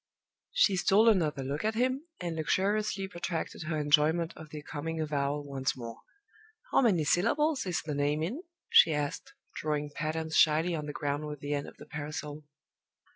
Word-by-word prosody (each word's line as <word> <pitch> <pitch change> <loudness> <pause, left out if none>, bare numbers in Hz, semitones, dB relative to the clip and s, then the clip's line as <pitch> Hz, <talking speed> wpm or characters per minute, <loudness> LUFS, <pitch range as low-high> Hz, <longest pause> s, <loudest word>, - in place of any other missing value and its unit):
She - - +3
stole 210 +4 +4
another 155 -9 +1
look 140 +3 -3
at 220 +1 0
him, 260 +6 0
and 170 -2 -3
luxuriously 195 +4 0
protracted 175 -3 -4
her 160 -1 -1
enjoyment 155 +3 +3
of 160 -1 -11
the 150 0 -8
coming 160 +3 -4
avowal 145 -1 -1
once 135 -1 -2
more. 115 -2 -7 0.7
"How - - +5
many 195 - +3
syllables 255 - +2
is 180 - -1
the 150 - -3
name 145 +2 0
in?" 235 - -3 0.3
she 160 -2 +6
asked, 145 -1 -3 0.2
drawing 150 -1 -2
patterns 160 +1 -3
shyly 160 +2 +4
on 150 -2 -3
the - - -3
ground 145 +1 -2
with 150 -1 -6
the 145 +1 -3
end 145 -1 -2
of - - -12
the - - -11
parasol. 150 0 -6
155 Hz, 175 wpm, -30 LUFS, 145-185 Hz, 0.7 s, she